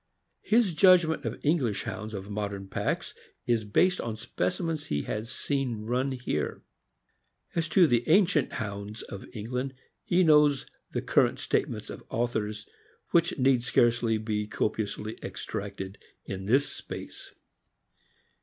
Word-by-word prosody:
His 220 -5 +3
judgment 175 -2 +5
of - - -3
English 135 - +1
Hounds 110 +2 -5
of 95 0 -6
modern 100 -1 -3
packs - - -2 0.3
is 115 -2 +2
based 180 - +2
on 115 -2 -3
specimens 145 - -2
he 75 -1 -1
has 110 +2 -4
seen 130 -5 -1
run 130 +4 0
here. 125 -1 -3 0.9
As 165 -1 -1
to 180 +1 +6
the 120 -4 +1
ancient 175 -4 +4
Hounds 100 +1 -5
of 100 - -8
Eng 110 +2 -6
land, 130 +2 -2 0.3
he 180 +1 +3
knows 150 -4 +5 0.3
the - - -2
current - - +3
statements - - -1
of - - -9
authors, 110 -3 -2 0.5
which 170 0 +3
need 130 -2 +4
scarcely 120 -2 +3
be 105 -1 -2
copiously 105 0 -2
extracted 95 +1 -5 0.3
in 95 0 -5
this 135 +6 +2
place. - - -8
120 Hz, 135 wpm, -28 LUFS, 105-150 Hz, 0.9 s, to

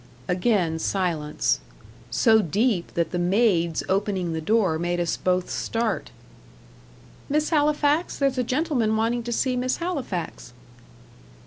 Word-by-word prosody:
Again 180 -3 +1
silence. 165 -6 0 0.5
So 220 -2 +4
deep 205 - 0
that 170 -2 0
the 175 - -2
maid's 175 -3 +2
opening 190 -3 0
the 160 - -3
door 190 -3 +2
made 175 +1 -1
us 170 -1 0
both 185 0 0
start. 225 - -2 1.2
"Miss 300 +3 +1
Halifax 300 +1 +2
there's 275 -2 +1
a - - +2
gentleman 250 -5 0
wanting 230 +2 0
to 240 +1 -5
see 255 +2 0
Miss 255 +1 -1
Halifax." 255 - -4
215 Hz, 125 wpm, -24 LUFS, 175-250 Hz, 1.2 s, So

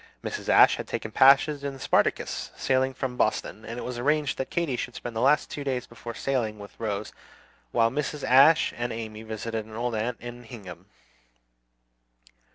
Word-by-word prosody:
Mrs. - - -5
Ashe - - +7
had - - -6
taken - - -4
passage 140 +2 +5
in 140 -1 -3
the - - -12
"Spartacus," - - 0
sailing 130 0 +1
from 125 -2 -4
Boston; 110 -1 -1
and 115 +2 -7
it - - -5
was 125 -1 -5
arranged 150 +2 +1
that 130 - -2
Katy 170 -7 -1
should - - -5
spend 120 -1 -6
the - - -1
last 145 +3 +3
two 145 - -5
days 130 -3 -2
before 120 0 -9
sailing, 120 -6 -1
with 100 -1 -11
Rose, 105 -2 -3 0.6
while 115 0 +3
Mrs. 150 +1 -3
Ashe 140 +5 +6
and 120 0 -3
Amy 110 -1 -6
visited 110 0 -4
an 110 - -11
old 120 +1 -2
aunt 115 +2 -2
in 120 0 -8
Hingham. 95 -7 -11
120 Hz, 180 wpm, -26 LUFS, 110-135 Hz, 0.6 s, Ashe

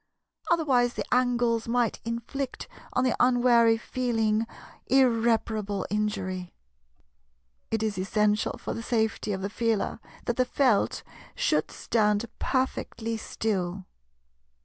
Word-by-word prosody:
Otherwise 265 -8 +2
the - - -3
angles 240 -2 +2
might 240 -1 +1
inflict 235 +4 -4 0.3
on 255 - +2
the 255 - +2
unwary 240 -2 +5
Feeling 225 -3 0 0.4
irreparable 225 -5 +2
injury. 195 -4 -2 1.1
It 225 -1 -1
is 210 -3 -1
essential 210 +2 +1
for - - -5
the 230 - -5
safety 220 -2 0
of 190 -1 -3
the - - 0
Feeler 225 -2 0 0.3
that 240 - -1
the 255 - +3
Felt 250 -4 +2 0.3
should - - +1
stand 210 -1 +1
perfectly 240 -3 -1
still. 195 -4 -2
230 Hz, 110 wpm, -27 LUFS, 210-245 Hz, 1.1 s, unwary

